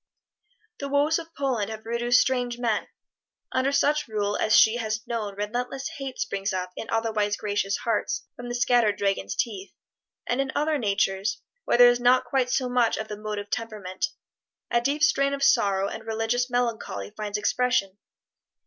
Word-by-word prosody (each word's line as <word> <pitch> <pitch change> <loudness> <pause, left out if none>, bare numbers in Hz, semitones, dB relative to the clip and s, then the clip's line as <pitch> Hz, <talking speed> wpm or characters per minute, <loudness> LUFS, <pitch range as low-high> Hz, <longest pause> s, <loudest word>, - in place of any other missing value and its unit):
The 280 - -4
woes 290 +3 +2
of 330 0 -10
Poland 255 -7 -1
have 220 0 -7
produced 240 +2 +3
strange 245 -2 0
men. 235 -3 0 0.6
Under 260 +1 +1
such 295 +1 +2
rule 205 -2 -1
as 215 +1 +2
she 220 +2 +6
has 220 -1 -3
known 220 -4 -3
relentless 245 +6 -3
hate 270 -2 -5
springs 195 +1 -2
up 185 -1 -3
in 225 - -7
otherwise 215 -2 0
gracious 205 -1 -1
hearts 150 -10 -1
from 245 0 -8
the 240 - -3
scattered 240 -4 +3
dragons' 195 - -1
teeth; 200 -4 -3 0.5
and 245 +3 0
in 270 -1 -2
other 300 0 +1
natures, 200 -2 0 0.2
where - - +2
there 245 0 +9
is 245 - -1
not 250 +1 +4
quite 250 0 0
so 255 0 +1
much 245 -2 +2
of 220 - -5
the 210 - -4
motive 210 -1 -5
temperament, 210 -5 -3 0.6
a 235 - +3
deep 285 +5 0
strain 280 -4 +3
of 275 - -4
sorrow 195 -5 +3
and - - -7
religious 225 +3 0
melancholy 230 - -2
finds 210 -1 -3
expression. 210 -3 0
230 Hz, 170 wpm, -26 LUFS, 205-250 Hz, 0.6 s, there